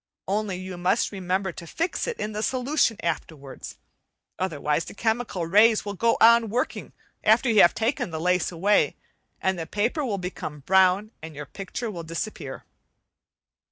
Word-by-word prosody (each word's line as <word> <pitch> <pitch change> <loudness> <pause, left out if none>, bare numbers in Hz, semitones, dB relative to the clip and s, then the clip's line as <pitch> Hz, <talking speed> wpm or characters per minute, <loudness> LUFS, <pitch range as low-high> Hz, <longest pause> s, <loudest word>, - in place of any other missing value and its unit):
Only 200 0 -1
you 185 -1 -7
must 185 +6 +1
remember 190 0 -2
to 170 0 -10
fix 335 - -2
it 475 - -4
in 210 - -3
the 210 0 -4
solution 255 -1 +1
afterwards, 150 -4 -5 0.6
otherwise 155 -3 -1
the - - -10
chemical 220 -5 -1
rays 210 +6 +4
will 205 - -3
go 230 +4 +2
on 230 0 +6
working 245 +5 -2 0.3
after 230 +3 +4
you 215 - +6
have 175 - +6
taken 240 0 -1
the 160 -2 -5
lace 180 +1 +1
away, 195 +5 +2 0.5
and 190 -2 0
all - - -2
the - - -10
paper 235 +9 -1
will 220 -7 -1
become 180 -5 -6
brown 190 +6 +3
and 160 -1 -9
your 150 +1 -6
picture 200 - -6
will 175 -4 -6
disappear. 165 +6 -6
195 Hz, 165 wpm, -25 LUFS, 175-225 Hz, 0.6 s, on